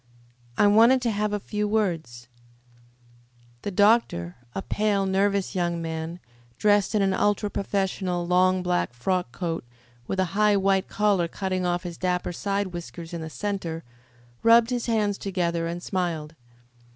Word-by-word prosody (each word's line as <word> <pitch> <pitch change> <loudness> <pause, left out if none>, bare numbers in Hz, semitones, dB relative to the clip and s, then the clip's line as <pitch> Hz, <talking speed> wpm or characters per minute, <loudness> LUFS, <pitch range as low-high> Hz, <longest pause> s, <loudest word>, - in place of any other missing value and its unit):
"I - - +5
wanted 225 +5 +6
to 235 - +1
have 210 0 -1
a 210 - -1
few 210 +1 -2
words." 165 - -1 1.3
The - - -3
doctor, 205 - +2 0.2
a 195 - -3
pale, 205 -2 0
nervous 195 +1 +1
young 175 -2 -1
man, 165 +1 -4 0.4
dressed 205 0 +3
in 205 - +3
an 195 -1 +2
ultra 205 +1 +1
professional, 190 -3 -1
long 185 +1 +3
black 175 -8 0
frock 180 +3 -1
coat, 165 +2 -3 0.4
with 190 - -2
a 185 - +3
high, 210 0 +4
white 195 -1 +2
collar 200 -4 +1
cutting 185 +1 -2
off 175 0 -1
his 175 -2 -7
dapper 180 -1 -1
side 200 0 -2
whiskers 170 -1 -8
in 170 - -4
the 160 - -5
centre, 175 -4 -4 0.6
rubbed 230 +1 +5
his 245 -1 -2
hands 210 -3 +1
together 170 -4 -1
and 170 +1 -5
smiled. 165 -5 -2
190 Hz, 150 wpm, -25 LUFS, 175-205 Hz, 1.3 s, wanted